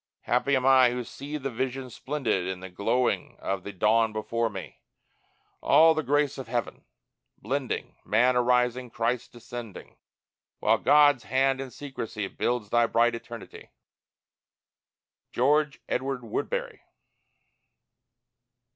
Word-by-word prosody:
Happy 125 +3 +1
am 130 -1 0
I 130 -2 +6
who 125 0 -3
see 145 +5 -7
the 135 -2 -4
Vision 130 +1 -3
splendid 125 -10 -2
In 95 -1 -4
the 95 0 -9
glowing 120 +7 0
of 95 -1 -3
the 100 - -7
dawn 110 +3 +2
before 115 +2 -1
me, 95 -3 -9 0.8
All 160 +1 +6
the 155 - -1
grace 145 0 0
of 130 - -7
heaven 120 0 -3 0.5
blending, 130 +3 -3
Man 125 +4 +3
arising, 125 0 +2
Christ 115 +2 -2
descending, 120 -3 -9 0.6
While - - +2
God's 145 -3 +5
hand 135 0 +1
in 135 - -6
secrecy 115 -6 -5
Builds 120 0 -2
thy 120 0 +4
bright 115 +1 +3
eternity. 115 -1 -9 1.6
GEORGE 145 +3 +2
EDWARD 130 -1 -2
WOODBERRY. 115 - -3
125 Hz, 120 wpm, -27 LUFS, 115-135 Hz, 1.6 s, I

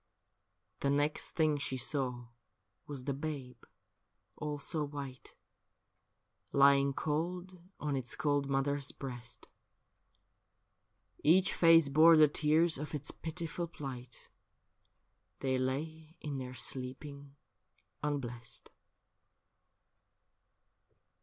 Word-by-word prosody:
The 140 - 0
next 145 +2 0
thing 155 -3 +2
she 130 -1 -2
saw 125 -2 -2 0.6
was 140 -3 -6
the 140 - -1
babe, 135 -5 -5 0.7
all 150 -1 -3
so 150 +2 0
white, 140 -3 -7 1.2
Lying 140 0 +5
cold 175 +5 -3 0.2
on 150 -2 -1
its 125 -2 -3
cold 145 -1 0
mother's 140 +1 0
breast. 125 -2 -8 1.8
Each 185 +5 +5
face 165 -3 +6
bore 160 +3 +7
the 155 -1 +8
tears 155 +1 +3
of 150 +1 -4
its 145 -1 -1
pitiful 170 +1 -4
plight 130 -6 -8 0.5
— - - -40
They 130 -1 +1
lay 155 +5 -3
in 145 -3 -4
their 130 0 -6
sleeping 140 +4 -4 0.7
unblest. 125 -5 -3
140 Hz, 95 wpm, -33 LUFS, 130-155 Hz, 1.8 s, the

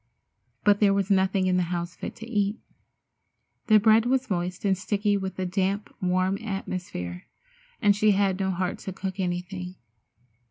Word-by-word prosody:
But 205 -1 +4
there 200 -2 +4
was 200 0 0
nothing 190 0 +3
in 185 0 +2
the - - +3
house 175 0 -3
fit - - -6
to 225 - -9
eat. 205 -2 0 1.1
The 215 - +7
bread 220 +2 +5
was 260 -2 0
moist 180 +2 -2
and 195 -1 +3
sticky 205 +2 0
with 190 -2 -3
the 185 - -2
damp, 195 +2 -1
warm 185 +1 +1
atmosphere, 180 - -5 0.6
and 205 -1 +5
she 215 +1 +3
had 195 -1 +1
no 190 -1 0
heart 185 0 -2
to 190 - -6
cook 190 +1 -5
anything. 180 0 -3
190 Hz, 165 wpm, -26 LUFS, 185-205 Hz, 1.1 s, The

